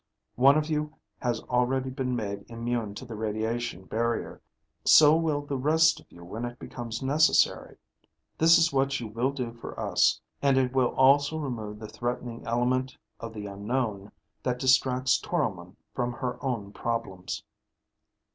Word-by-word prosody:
"One 135 +4 +5
of 155 0 0
you 150 -1 -2 0.2
has 120 -2 -1
already 130 +1 0
been 130 -1 -2
made 100 -3 -5
immune 115 -2 -3
to 130 - -8
the 115 - -8
radiation 110 -1 -3
barrier. 115 +3 -2 0.4
So 150 0 +7
will 160 -3 0
the 140 -2 -3
rest 160 +4 +4
of - - -21
you 85 0 -13
when 105 +7 -6
it 120 0 -5
becomes 115 -1 -6
necessary. 150 +4 +2 0.6
This 165 +1 +7
is 165 -2 +3
what 135 0 +1
you 120 - -5
will 115 +5 -1
do 125 -4 -4
for 115 - -9
us, - - +2 0.2
and 140 -1 +3
it 130 -1 +1
will 130 -2 +1
also 140 +3 +4
remove 115 -8 -4
the 110 0 -8
threatening 120 +1 -4
element 130 +3 0 0.2
of 115 - -6
the 105 -2 -7
unknown 105 0 -3 0.3
that 125 -1 -1
distracts 130 0 +3
Toromon 100 - -3 0.2
from 120 -1 -2
her 125 +2 -5
own 115 -7 -3
problems." 115 -6 -4
125 Hz, 155 wpm, -27 LUFS, 115-135 Hz, 0.6 s, So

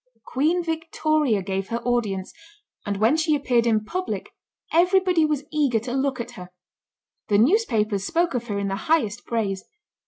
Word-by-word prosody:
Queen 320 +7 +1
Victoria 310 - 0
gave 195 0 -3
her 230 - -2
audience, 215 -6 -1 0.5
and 200 -1 -1
when 220 +8 +3
she 315 -1 +2
appeared 245 -5 +1
in 215 -2 +2
public, 370 +10 -4 0.4
everybody 360 0 +4
was 300 -2 -1
eager 290 -6 +2
to 240 +3 -4
look 270 -1 0
at 235 +1 -5
her. 180 -6 -10 0.8
The 205 - +3
newspapers 220 - +2
spoke 340 - 0
of 240 -2 -3
her 205 -3 -2
in 200 0 -1
the 195 - -1
highest 240 -8 +1
praise. 200 -5 -1
245 Hz, 160 wpm, -24 LUFS, 210-315 Hz, 0.8 s, everybody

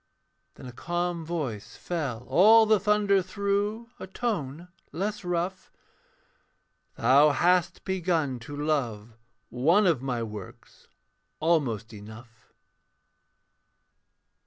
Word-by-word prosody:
Then - - -12
a 125 - -8
calm 175 +5 -3
voice 130 -10 -5
fell 135 -9 -4
all 220 +4 +6
the 215 -1 +3
thunder 205 -1 +2
through, 200 +4 -2
A - - -7
tone 175 - -4 0.2
less 200 +6 -3
rough: 180 +2 -3 1.2
'Thou 140 +4 +5
hast 175 +4 +1
begun 165 -8 -1
to 145 +5 -9
love 120 -8 -2 0.4
one 165 - +3
of 165 -9 +2
my 125 -3 -2
works 105 -4 -11 0.5
Almost 125 -10 0
enough.' 110 +3 -13
165 Hz, 100 wpm, -27 LUFS, 125-190 Hz, 1.2 s, all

